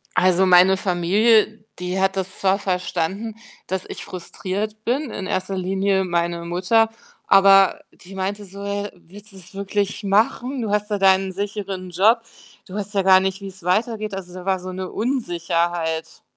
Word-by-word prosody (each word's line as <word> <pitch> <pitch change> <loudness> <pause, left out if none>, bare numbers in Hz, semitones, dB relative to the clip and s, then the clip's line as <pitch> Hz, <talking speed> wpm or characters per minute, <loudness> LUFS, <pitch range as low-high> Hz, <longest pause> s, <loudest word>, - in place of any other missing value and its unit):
Also, 185 +1 +4
meine 185 +1 +6
Familie, 205 +5 +2 0.2
die 180 +1 -2
hat 190 0 +1
das 190 0 -4
zwar 195 0 +2
verstanden, 190 +3 -2 0.3
dass 190 0 -3
ich - - -7
frustriert 200 +4 -5
bin, 255 +3 -1
in 190 - -5
erster 190 -1 -2
Linie 190 +1 0
meine 170 -1 -1
Mutter, 190 +6 +2 0.4
aber 195 0 +6
die 190 +2 -14
meinte 195 +2 -3
so, 200 +1 -10
äh: 200 0 -3
„Willst 200 +4 -15
du 195 - -13
's 185 +1 -13
wirklich 200 +1 -2
machen? 235 +6 +1
Du 215 - -2
hast 210 +1 0
da 205 - 0
deinen 190 0 +3
sicheren 195 -1 -5
Job. 215 +7 +4 0.5
Du 185 - -11
weißt 205 0 -4
ja 195 - +2
gar 190 0 +7
nicht, 190 0 -2
wie's 190 -2 -9
weitergeht.“ 215 +3 0
Also, 180 -2 -8
da 185 0 -9
war 190 -1 +1
so 185 +1 -7
'ne 185 0 -5
Unsicherheit. 170 -8 -2
195 Hz, 170 wpm, -22 LUFS, 185-205 Hz, 0.5 s, gar